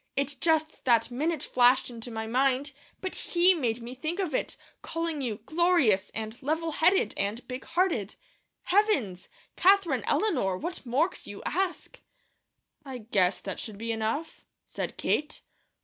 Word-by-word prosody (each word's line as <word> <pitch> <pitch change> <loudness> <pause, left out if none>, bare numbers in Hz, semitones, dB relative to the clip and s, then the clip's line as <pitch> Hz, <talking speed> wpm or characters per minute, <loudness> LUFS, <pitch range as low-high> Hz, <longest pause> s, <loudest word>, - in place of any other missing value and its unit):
It 280 0 -1
just 315 -1 +1
that 235 -1 +3
minute 305 +4 -1
flashed 250 +1 +3
into 235 0 -8
my 220 -1 -4
mind; 265 +4 +1 0.3
but 375 - -3
HE 355 +2 +3
made 240 -8 -1
me 240 +2 -7
think 310 +7 -4
of 370 -7 -2
it, - - -2 0.2
calling 330 -3 -3
you 235 -5 -2
'glorious,' 315 - +3
and 220 +1 -5
'level 320 +4 -1
headed,' 320 - +3
and 205 +5 -2
'big 255 0 -6
hearted.' 330 - 0 0.5
Heavens! 310 - +1 0.3
Katherine 390 -1 +4
Eleanor, 250 - +1
what 340 - -6
more 275 +8 +3
could - - -13
you 205 - -8
ask?" 375 +1 -2 0.8
"I 265 -3 -6
guess 200 -5 +1
that 195 - -5
should 215 -4 -6
be 230 +2 -3
enough," 225 +9 -3 0.2
said - - -5
Kate. 300 +1 -1
265 Hz, 150 wpm, -28 LUFS, 225-330 Hz, 0.8 s, Katherine